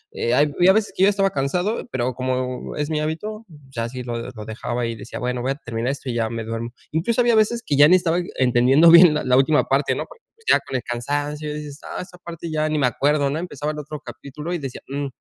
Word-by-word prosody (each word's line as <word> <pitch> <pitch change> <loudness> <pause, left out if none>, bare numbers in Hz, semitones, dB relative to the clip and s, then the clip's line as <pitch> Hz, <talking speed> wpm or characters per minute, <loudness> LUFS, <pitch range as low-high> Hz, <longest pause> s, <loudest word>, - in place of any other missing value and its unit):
hay 140 +5 +2
a 190 - +8
veces 220 0 +1
que 185 - +3
yo 200 - +7
estaba 195 -1 +2
cansado, 180 - -1
pero 125 0 -1
como 130 0 -3
es 150 0 -2
mi 155 -1 0
hábito, 210 +9 -4 0.2
ya 115 -3 -4
así 125 +2 -5
lo 120 -1 -5
lo 110 -2 -9
dejaba 115 +2 -3
y 115 - -4
decía - - -8
bueno, 125 0 -2
voy 130 - 0
a - - -2
terminar 120 -2 -3
esto 140 -2 -6
y 120 - -2
ya 115 -1 0
me 115 -1 -4
duermo. 115 +1 -4 0.2
Incluso 220 +10 +1
había 235 -1 +3
veces 225 +2 +2
que 145 - -1
ya 145 +1 +8
ni 180 - +6
estaba 170 -1 0 0.2
entendiendo 130 +5 +5
bien 170 -1 +9
la 130 -4 +2
última 150 +3 +3
parte, 135 +1 +1
no - - -3 0.4
ya - - +6
con - - -7
el 130 - 0
cansancio 145 +5 -3
dices 150 -1 -7
ah, - - -5
esa 180 0 -11
parte 170 -1 -8
ya 155 0 0
ni 155 -1 0
me 135 - +3
acuerdo, 145 +2 +1
¿no?, 145 - -2
empezaba 155 -4 -4
el 150 - -8
otro 150 0 -7
capítulo 150 +2 -8
y 175 - 0
decía, 135 -5 -7
mm, 140 +1 -3
145 Hz, 240 wpm, -22 LUFS, 125-165 Hz, 0.4 s, bien